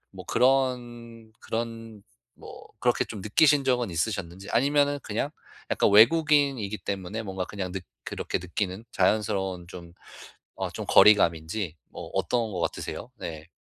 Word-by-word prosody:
뭐 - - -8
그런 120 -3 0
그런 115 -2 -5 0.3
뭐 - - -12
그렇게 120 0 +2
좀 110 - -8
느끼신 140 +8 +4
적은 125 -4 +1
있으셨는지 95 +1 -3
아니면은 145 +3 +2
그냥 115 +7 -2 0.4
약간 - - +3
외국인이기 135 -2 +4
때문에 100 +3 -4
뭔가 95 -2 -4
그냥 95 -2 -5
느 95 - -3 0.2
그렇게 - - -3
느끼는 95 +4 -4
자연스러운 95 -2 0
좀 85 -1 -11 0.6
어 - - -2
좀 - - -6
거리감인지 85 -3 +4
뭐 - - -9
어떤 115 -3 0
것 90 - -4
같으세요? 85 - -4
네. 80 -1 -7
110 Hz, 305 characters per minute, -26 LUFS, 95-120 Hz, 0.6 s, 느끼신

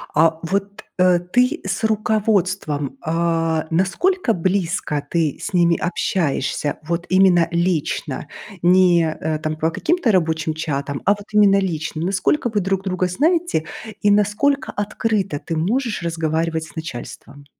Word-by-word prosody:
а 160 +1 +3
вот, 200 +3 -3 0.2
э, 180 -1 +5
ты 250 - +1
с 195 +3 -3
руководством, 195 - 0
а, 165 -1 0
насколько 230 - +1
близко 180 -3 -1
ты 160 -4 0
с 205 - -5
ними 170 -1 +3
общаешься? 150 -5 -1
Вот 170 +2 -3
именно 185 -3 +4
лично, 170 -4 -1 0.3
не, 175 -1 +5
а, 155 0 -3
там 155 0 -3
по 160 +1 0
каким-то 320 - +1
рабочим 160 -3 +1
чатам, 140 -3 -3
а 200 - +5
вот 205 0 -2
именно 205 -2 +5
лично. 160 -4 -3
Насколько 200 +8 +1
вы 215 - 0
друг 195 0 -1
друга 185 -1 -1
знаете, 320 - +1 0.4
и 205 - +4
насколько 210 +7 +1
открыто 205 -5 -1
ты 165 - -5
можешь 220 +7 -1
разговаривать 160 -1 -1
с - - -16
начальством? 140 -1 -8
180 Hz, 135 wpm, -20 LUFS, 160-205 Hz, 0.4 s, э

